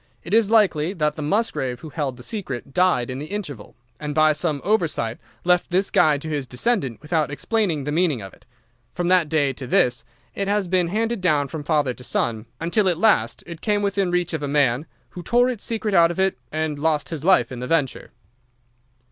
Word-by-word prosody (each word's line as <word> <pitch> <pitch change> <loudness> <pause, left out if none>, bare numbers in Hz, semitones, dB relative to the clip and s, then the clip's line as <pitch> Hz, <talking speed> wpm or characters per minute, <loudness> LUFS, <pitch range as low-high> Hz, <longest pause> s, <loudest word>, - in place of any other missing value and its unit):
It 170 - -6
is 225 -2 +4
likely 190 -7 +3
that 150 -5 0
the 155 - -6
Musgrave 145 - -1
who 160 - -8
held 140 -4 -3
the 125 - -11
secret 140 - -6
died 180 -9 +2
in 130 - -5
the 150 - -6
interval, 155 - -6 0.2
and 150 -1 -4
by 155 0 +5
some 155 -1 -1
oversight 165 - 0 0.2
left 180 0 +2
this 185 +2 +1
guide 150 -4 +3
to - - -5
his 145 -4 -3
descendant 135 - -1
without 155 -1 0
explaining 170 0 -1
the 150 - -3
meaning 160 -4 +1
of 95 -2 -9
it. - - -20 0.5
From 175 0 -1
that 180 -4 +4
day 145 -3 +1
to 130 0 -7
this 120 0 +2 0.3
it 200 - -2
has 200 -1 +1
been 180 -1 +2
handed 225 +3 -1
down 150 -6 +2
from 150 +1 -6
father 150 -4 +1
to 125 - -13
son, 115 -2 -2
until 185 +4 +2
at 175 - 0
last 215 +4 +2
it 170 -2 -9
came 205 -2 0
within 200 -2 0
reach 175 -1 0
of 160 - -2
a 145 - -2
man 140 -1 +1 0.2
who 180 - -8
tore 245 +7 +3
its 230 -5 -5
secret 220 -2 -2
out 170 -2 +6
of 175 - -5
it 190 0 +2 0.2
and 155 -1 -2
lost 155 -1 0
his 160 -3 -5
life 185 -4 +4
in 125 - -6
the 125 - -4
venture. 145 -5 0
160 Hz, 215 wpm, -22 LUFS, 145-190 Hz, 0.5 s, out